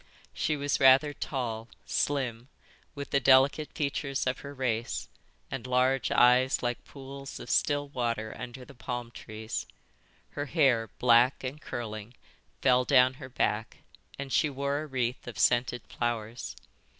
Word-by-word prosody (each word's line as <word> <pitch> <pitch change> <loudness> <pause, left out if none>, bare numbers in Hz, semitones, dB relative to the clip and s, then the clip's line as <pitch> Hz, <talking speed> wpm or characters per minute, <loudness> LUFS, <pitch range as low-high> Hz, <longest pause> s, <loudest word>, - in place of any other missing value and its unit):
She 155 -1 0
was 145 0 0
rather 135 +2 +6
tall, 115 -6 -4 0.2
slim, 125 -4 -1 0.5
with 140 0 -6
the 140 - +4
delicate 135 +3 +4
features 140 -2 -1
of 130 0 -1
her 140 - -8
race, 120 -4 -2 0.4
and 130 -2 -4
large 125 0 +2
eyes 125 +2 +4
like 120 0 -2
pools 135 0 -9
of - - -6
still 145 -1 +2
water 115 -5 -2
under 125 +1 -8
the 140 - -13
palm 120 -1 -5
trees; 110 0 -6 0.6
her 145 0 -4
hair, 130 -8 +3
black 125 +2 +4
and 135 +4 -5
curling, 110 0 -6 0.5
fell 125 -1 +5
down 130 -1 +5
her 130 - -7
back, 110 -3 -1 0.4
and 135 -2 -5
she 155 - +3
wore 140 +1 -1
a 155 - -6
wreath 125 -3 -2
of 120 - -7
scented 120 0 +2
flowers. 120 0 -3
130 Hz, 145 wpm, -29 LUFS, 120-140 Hz, 0.6 s, rather